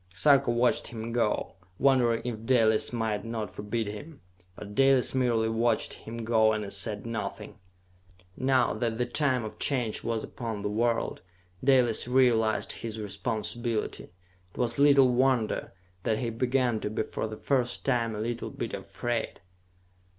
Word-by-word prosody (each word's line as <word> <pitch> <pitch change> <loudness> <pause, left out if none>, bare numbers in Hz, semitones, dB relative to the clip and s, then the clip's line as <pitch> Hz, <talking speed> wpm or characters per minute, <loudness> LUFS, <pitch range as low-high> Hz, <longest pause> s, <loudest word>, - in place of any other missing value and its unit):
Sarka 140 +5 +4
watched 120 +1 +2
him 115 0 -6
go, 115 -5 0 0.2
wondering 120 -4 +3
if 115 -3 -4
Dalis 115 -3 +3
might 110 -3 -1
not 115 -2 -4
forbid 110 +2 -3
him. 105 +10 -8 0.4
But 105 +1 -9
Dalis 135 +1 +4
merely 120 -4 +2
watched 115 0 0
him 115 +1 -9
go 110 -1 +4
and 105 -2 -3
said 105 +2 -2
nothing. 115 -1 -5 0.8
Now 130 -1 +2
that 115 -2 -2
the 125 - 0
time 130 -1 0
of 110 - -8
Change 125 -6 0
was 115 -1 -2
upon 110 -4 -5
the 105 - -1
world, 115 +2 0 0.4
Dalis 125 -4 +3
realized 120 -4 +3
his 110 -1 -6
responsibility. 110 +2 -3
It 90 0 -27
was 120 0 -1
little 140 -3 +6
wonder 125 -3 +1 0.3
that 110 +3 0
he 120 -1 -2
began 125 0 +1
to 105 - -3
be 110 - -1
for - - -4
the 110 0 -7
first 125 -3 0
time 115 -2 +1
a - - -5
little 120 +1 -3
bit - - -5
afraid. 120 -2 -3
115 Hz, 150 wpm, -28 LUFS, 110-125 Hz, 0.8 s, little